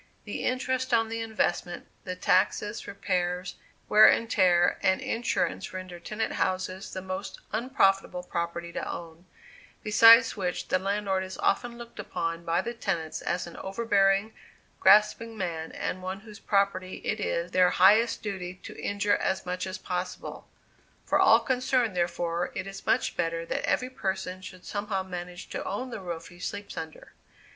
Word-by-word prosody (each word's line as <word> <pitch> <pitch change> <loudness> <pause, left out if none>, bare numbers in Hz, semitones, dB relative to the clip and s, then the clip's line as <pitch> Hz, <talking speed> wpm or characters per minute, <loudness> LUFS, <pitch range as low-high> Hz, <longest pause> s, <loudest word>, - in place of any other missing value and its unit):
The - - -4
interest 255 0 0
on 225 -1 +2
the 225 0 -3
investment, 215 -5 -1 0.2
the 185 - -3
taxes, 200 +3 +1
repairs, 180 -2 -2 0.3
wear 215 +1 +8
and 230 - +3
tear, 175 -4 +3
and 190 -1 +3
insurance 230 0 -1
render 185 -2 -7
tenant 215 +6 -3
houses 185 +1 -2
the 185 - -5
most 190 +1 -5
unprofitable 195 -6 +1
property 170 -1 -3
to - - -4
own; 170 +1 -9 0.6
besides 230 +2 +7
which 180 -4 -3
the 185 - +2
landlord 195 0 0
is 190 0 -7
often 235 +3 0
looked 235 -2 -11
upon 165 -4 -3
by 170 +2 +1
the 235 - -4
tenants 175 -9 -3
as 175 +1 -1
an 170 - -10
overbearing, 195 0 +1 0.5
grasping 220 +2 +4
man 165 -4 -3
and 185 - -4
one 190 +1 -5
whose 215 -1 -12
property 195 -2 0
it 215 - -1
is 170 -3 -2
their 180 -1 +5
highest 215 +7 +4
duty 185 -3 -4
to - - -9
injure 205 0 +1
as 190 - -1
much 180 +1 -3
as 185 +2 -5
possible; 180 0 -5 0.6
for - - +2
all - - +7
concerned 255 -4 +1
therefore, 175 0 -1
it - - -3
is 195 0 -9
much - - +2
better 165 0 -1
that - - -2
every 255 0 0
person 190 -5 -3
should 185 -1 -11
somehow 205 -2 -2
manage 180 -1 -7
to - - -4
own 250 +6 -4
the 215 - -6
roof 170 -2 -6
he 175 -1 -15
sleeps 200 +2 -5
under. 160 -1 -8
190 Hz, 160 wpm, -28 LUFS, 180-215 Hz, 0.6 s, wear